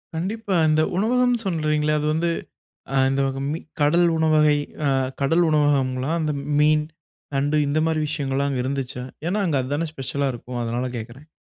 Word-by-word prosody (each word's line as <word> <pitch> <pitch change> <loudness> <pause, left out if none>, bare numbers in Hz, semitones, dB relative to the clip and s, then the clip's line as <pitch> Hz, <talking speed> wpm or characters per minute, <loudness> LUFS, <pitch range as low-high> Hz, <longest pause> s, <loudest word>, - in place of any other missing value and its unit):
கண்டிப்பா. 200 +3 -2
இந்த 155 0 +3 0.2
உணவகம் 245 +4 +2
சொல்றீங்களே, 155 -3 +1
அது 150 - -1
வந்து, 170 +2 0 0.6
ஆ - - 0
இந்த 135 +1 +1 0.3
மீ 160 - -3 0.2
கடல் 170 +4 +4
உணவகை, 155 -2 +4 0.3
அ - - +3 0.3
கடல் 165 +5 +3
உணவகம்ங்களா? 140 -2 +1
அந்த 155 -2 -1 0.3
மீன், 150 0 +4 0.5
நண்டு 145 +2 +1
இந்த 150 +2 +1
மாரி 160 -1 0
விஷயங்கல்லாம் 140 -2 -1
அங்க 125 -2 -1
இருந்துச்சா? 130 -2 -3 0.2
ஏன்னா 205 +3 0
அங்க 145 -4 +1
அது 130 +3 -4
தானே 165 +2 -1
ஸ்பெஷலா 140 +1 -2
இருக்கும் 120 +1 -6
அதனால 120 +2 -2
கேக்குறேன். 120 +7 -9
150 Hz, 160 wpm, -23 LUFS, 135-160 Hz, 0.6 s, கடல்